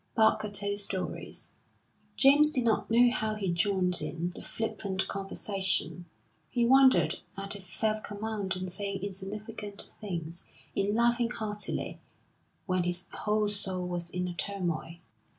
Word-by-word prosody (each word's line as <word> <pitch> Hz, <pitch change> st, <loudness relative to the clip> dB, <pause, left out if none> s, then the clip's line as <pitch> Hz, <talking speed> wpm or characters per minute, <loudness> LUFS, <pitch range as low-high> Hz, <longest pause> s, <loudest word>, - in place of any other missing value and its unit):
Barker 220 Hz, -1 st, +3 dB
told 205 Hz, 0 st, +2 dB
stories. 195 Hz, -2 st, -1 dB, 0.7 s
James 285 Hz, +3 st, +7 dB
did 260 Hz, -5 st, 0 dB
not 225 Hz, -2 st, +1 dB
know 240 Hz, +2 st, +6 dB
how 220 Hz, -3 st, -1 dB
he 195 Hz, -4 st, -1 dB
joined 180 Hz, 0 st, +2 dB
in 170 Hz, +1 st, -3 dB
the -, -, -8 dB
flippant 200 Hz, -4 st, -2 dB
conversation; 195 Hz, -2 st, -1 dB, 0.4 s
he 240 Hz, -1 st, +1 dB
wondered 265 Hz, +1 st, +5 dB, 0.2 s
at 195 Hz, 0 st, -3 dB
his 195 Hz, -2 st, -7 dB
self 215 Hz, +2 st, -1 dB
command 205 Hz, -2 st, -3 dB
in 185 Hz, 0 st, -4 dB
saying 195 Hz, +1 st, -4 dB
insignificant 205 Hz, +1 st, -6 dB
things, 170 Hz, -4 st, -6 dB, 0.3 s
in 200 Hz, +1 st, 0 dB
laughing 235 Hz, 0 st, +3 dB
heartily, 210 Hz, -3 st, -3 dB, 0.7 s
when 185 Hz, -2 st, +1 dB
his 175 Hz, +1 st, -1 dB
whole 210 Hz, 0 st, 0 dB
soul 190 Hz, -3 st, +2 dB
was 175 Hz, -1 st, -2 dB
in 180 Hz, 0 st, -2 dB
a 175 Hz, -, -4 dB
turmoil. 170 Hz, -2 st, -3 dB
200 Hz, 135 wpm, -30 LUFS, 185-215 Hz, 0.7 s, James